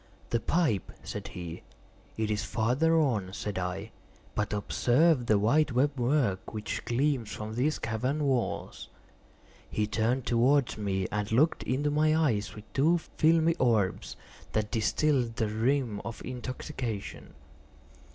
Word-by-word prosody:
"The 115 - +2
pipe," 155 - 0
said - - -6
he. 85 -2 -7 0.6
"It 110 -1 0
is 105 -1 -1
farther 125 - +2
on," 105 -11 0
said 100 -2 -3
I; 90 +4 -4 0.4
"but 105 0 -1
observe 125 +6 +2
the 105 - +4
white 135 +7 +2
web 140 +4 +2
work 120 -6 0
which 110 0 -4
gleams 130 -2 0
from 110 0 -5
these 135 +7 +1
cavern 125 +7 -1
walls." 130 -4 -2 0.8
He 105 - 0
turned 115 +4 0
towards 125 +2 +3
me, 95 -3 -1
and 105 0 -2
looked 145 +9 +3
into 145 +4 0
my 155 +1 +3
eyes 110 -11 0
with 105 - -9
two 160 +6 +4
filmy 165 0 +2
orbs 100 - +1 0.4
that 105 -1 0
distilled 120 +1 +1
the 110 - 0
rheum 115 0 0
of 120 -1 -7
intoxication. 125 - -5
120 Hz, 135 wpm, -29 LUFS, 105-145 Hz, 0.8 s, the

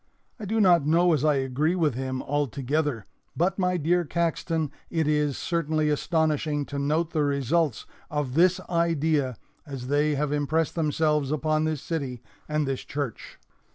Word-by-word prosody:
I 215 - -5
do 220 +3 0
not 175 -6 +5
know 170 +4 +4
as 150 -3 0
I 150 -1 +4
agree 135 +5 0
with 160 -6 +1
him, 130 +1 -3
altogether; 140 -3 -1 0.3
but, 190 +4 +1
my 180 -1 +1
dear 175 +3 +2
Caxton, 165 -2 -1 0.2
it 160 -2 0
is 150 -2 +1
certainly 155 -3 0
astonishing 155 -1 0
to 140 - -1
note 155 +4 0
the 155 -2 +1
results 140 0 0 0.2
of 145 -4 -2
this 180 +4 +4
idea 160 -7 +1 0.3
as 135 -5 -7
they 145 +1 +2
have 145 +1 -1
impressed 150 +2 0
themselves 150 -3 +1
upon 155 +1 +1
this 155 -3 -2
city 135 -7 -4 0.3
and 150 -1 0
this 135 -1 -2
church. 145 -6 -5
150 Hz, 155 wpm, -26 LUFS, 140-165 Hz, 0.3 s, not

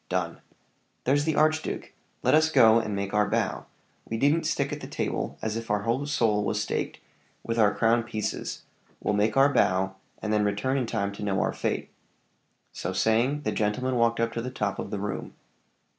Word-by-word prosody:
"Done." - - -2 0.6
"There's 145 +3 +2
the 160 -2 +1
archduke! 155 +1 0 0.3
Let - - +3
us 155 +1 +4
go 115 -5 +6
and 110 -3 -3
make 100 0 -3
our 105 0 +2
bow; - - -1 0.4
we 115 - -4
needn't 145 +7 +2
stick - - 0
at - - -4
the - - -6
table - - -3
as 110 0 -1
if 115 0 -5
our 105 -1 +1
whole 125 +6 0
soul 110 -7 +2
were 105 - -1
staked 105 0 -2 0.4
with 115 0 -2
our 105 -2 +5
crown 115 +1 +3
pieces 110 -2 -4 0.4
we'll - - -1
make 105 +3 +1
our 140 +1 +5
bow, 95 -1 +2 0.3
and 110 0 -2
then 105 -1 +3
return 105 +7 0
in 125 - -2
time 100 -3 -1
to 100 - -8
know 100 -2 0
our - - 0
fate." - - -2 0.8
So - - -4
saying, 120 +7 +2
the 110 - -1
gentlemen 110 +5 0
walked 115 -1 +2
up 115 0 +1
to 115 - -2
the 125 - -4
top 105 -6 -2
of - - -4
the 105 - -3
room. 100 0 -4
115 Hz, 200 wpm, -27 LUFS, 105-130 Hz, 0.8 s, go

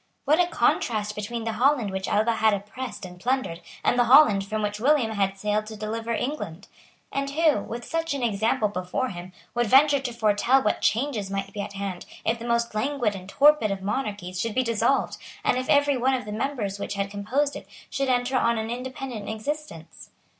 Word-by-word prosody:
What 305 +4 +4
a 355 - +4
contrast 215 -10 +1
between 215 +3 -4
the 225 - -1
Holland 240 -2 +2
which 190 0 -3
Alva 220 +2 +2
had 220 -1 +4
oppressed 210 +1 -7
and 180 -1 -11
plundered, 245 -7 -1 0.2
and 245 - +2
the 245 - +5
Holland 230 -6 +6
from 215 +2 -3
which 210 0 -2
William 260 -2 +3
had 195 -2 0
sailed 210 +1 -1
to 220 - -7
deliver 225 +2 -4
England! 230 - -3 0.4
And 275 0 -2
who, 305 -3 +3
with 235 +3 -6
such 330 -2 -2
an 270 - -3
example 220 -1 +1
before 190 +6 -2
him, 180 0 -8 0.2
would 240 -1 +1
venture 280 +4 +6
to 260 -2 -4
foretell 235 +4 +2
what 210 - 0
changes 230 -4 0
might 195 0 -4
be 205 - -3
at 200 0 -6
hand, 195 -2 -5 0.2
if 230 +1 +1
the 230 - -7
most 235 -1 +1
languid 240 -1 0
and 185 0 -9
torpid 290 -2 +5
of 195 -1 -3
monarchies 200 -5 -3
should 230 -1 -3
be 255 - +3
dissolved, 230 +3 +1 0.3
and 250 - +2
if 255 - -5
every 285 -1 +4
one 260 +2 +2
of 250 - -4
the 210 - -6
members 215 -4 -2
which 200 - -4
had 200 0 -2
composed 255 +8 -1
it - - -9 0.2
should 275 -1 -2
enter 250 +1 +1
on 235 -2 +2
an 220 +1 -3
independent 250 -3 -5
existence? 220 - -6
225 Hz, 205 wpm, -25 LUFS, 205-260 Hz, 0.4 s, Holland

